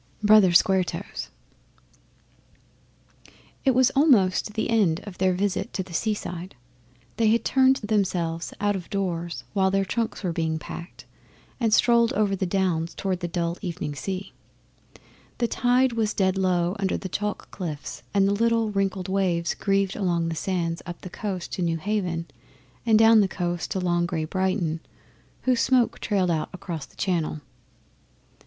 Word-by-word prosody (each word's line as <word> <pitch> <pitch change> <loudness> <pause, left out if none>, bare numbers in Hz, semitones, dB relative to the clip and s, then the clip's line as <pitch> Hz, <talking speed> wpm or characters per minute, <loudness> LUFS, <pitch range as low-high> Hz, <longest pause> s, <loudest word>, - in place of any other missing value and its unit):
Brother 210 -3 +6
Square 185 +2 +4
Toes - - -6 2.3
It 265 -3 +3
was 260 0 +4
almost 215 - +3
the 220 - 0
end 190 -8 +3
of 205 -4 -10
their 185 -1 +2
visit 200 +4 -1
to 190 - -2
the 180 -1 -13
seaside. 185 -2 -3 0.6
They 225 - +3
had 230 +2 +2
turned 265 0 +4
themselves 185 -7 -1
out 205 0 +1
of 180 -3 -6
doors 175 -4 -3
while 190 -2 +3
their 195 0 +1
trunks 230 +3 -2
were 175 -3 -1
being 160 -1 -1
packed, 170 +3 -9 0.5
and 230 -3 +1
strolled 235 +2 +4
over 205 -4 +1
the 190 -1 -2
Downs 175 -3 0
towards 190 -2 -2
the 175 - -2
dull 170 0 -2
evening 175 -6 -4
sea. 190 +6 -5 1.0
The 235 - +1
tide 250 +1 +2
was 220 -2 0
dead 190 -1 +2
low 180 -1 +1
under 195 -1 0
the 190 - -5
chalk 210 +3 -4
cliffs, 160 -7 -6
and 195 -1 +3
the 200 - +2
little 230 0 +1
wrinkled 195 -2 -1
waves 180 -4 0
grieved 195 -1 0
along 170 -4 0
the 165 - -3
sands 170 -1 -2
up 175 -1 -7
the 185 - -8
coast 190 -4 -4
to - - -3
Newhaven 170 0 -1 0.6
and 220 -1 +6
down 225 0 +7
the 200 - +3
coast 175 -2 -3
to 190 - -2
long, 175 -1 +1
grey 160 -2 -2
Brighton, 185 -2 -1 0.6
whose 255 -2 +2
smoke 250 -2 +2
trailed 190 -5 +1
out 155 -2 -1
across 175 -6 -6
the - - -24
Channel. 170 -5 -1
190 Hz, 160 wpm, -25 LUFS, 175-210 Hz, 2.3 s, down